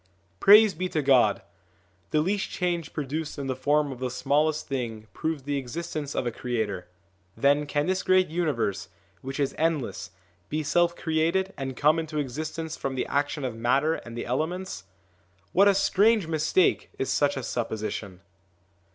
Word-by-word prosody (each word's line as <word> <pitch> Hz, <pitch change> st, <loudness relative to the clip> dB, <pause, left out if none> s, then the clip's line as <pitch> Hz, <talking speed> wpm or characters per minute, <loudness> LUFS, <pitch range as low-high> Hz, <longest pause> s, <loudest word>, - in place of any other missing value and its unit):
Praise 210 Hz, 0 st, +8 dB
be 180 Hz, +3 st, -3 dB
to 155 Hz, -4 st, -1 dB
God! 135 Hz, -3 st, +4 dB, 0.7 s
the 155 Hz, -, +2 dB
least 195 Hz, +5 st, -1 dB
change 175 Hz, -4 st, -2 dB
produced 150 Hz, +2 st, -4 dB
in 140 Hz, -, -4 dB
the 130 Hz, -1 st, -2 dB
form 145 Hz, +1 st, +1 dB
of 130 Hz, -, -8 dB
the 130 Hz, -1 st, -2 dB
smallest 150 Hz, +4 st, 0 dB
thing 115 Hz, -6 st, -4 dB
proves 160 Hz, -3 st, -3 dB
the 140 Hz, 0 st, -1 dB
existence 145 Hz, +2 st, -5 dB
of -, -, -1 dB
a 120 Hz, -, 0 dB
creator: 110 Hz, -7 st, -3 dB, 0.5 s
then 145 Hz, +1 st, +3 dB
can 145 Hz, 0 st, 0 dB
this 185 Hz, +1 st, 0 dB
great 185 Hz, 0 st, +3 dB
universe, 115 Hz, -, -1 dB, 0.3 s
which 135 Hz, +2 st, -6 dB
is 140 Hz, -2 st, 0 dB
endless, 135 Hz, -, -1 dB, 0.4 s
be 155 Hz, +1 st, -1 dB
self 170 Hz, +3 st, +2 dB
created 170 Hz, +5 st, 0 dB
and 135 Hz, -2 st, -5 dB
come 155 Hz, +3 st, +4 dB
into 160 Hz, -1 st, -4 dB
existence 155 Hz, +4 st, -4 dB
from 135 Hz, -1 st, -4 dB
the 130 Hz, -, -1 dB
action 145 Hz, 0 st, -1 dB
of 125 Hz, -, -2 dB
matter 135 Hz, +7 st, +2 dB
and 120 Hz, -6 st, -7 dB
the -, -, -4 dB
elements? 155 Hz, -, -3 dB, 0.7 s
What 200 Hz, +2 st, +6 dB
a 200 Hz, -, +5 dB
strange 200 Hz, +1 st, +3 dB
mistake 160 Hz, +3 st, +1 dB
is 135 Hz, -, -1 dB
such 145 Hz, -1 st, +2 dB
a 135 Hz, -, -4 dB
supposition 110 Hz, -5 st, -4 dB
150 Hz, 165 wpm, -26 LUFS, 130-165 Hz, 0.7 s, Praise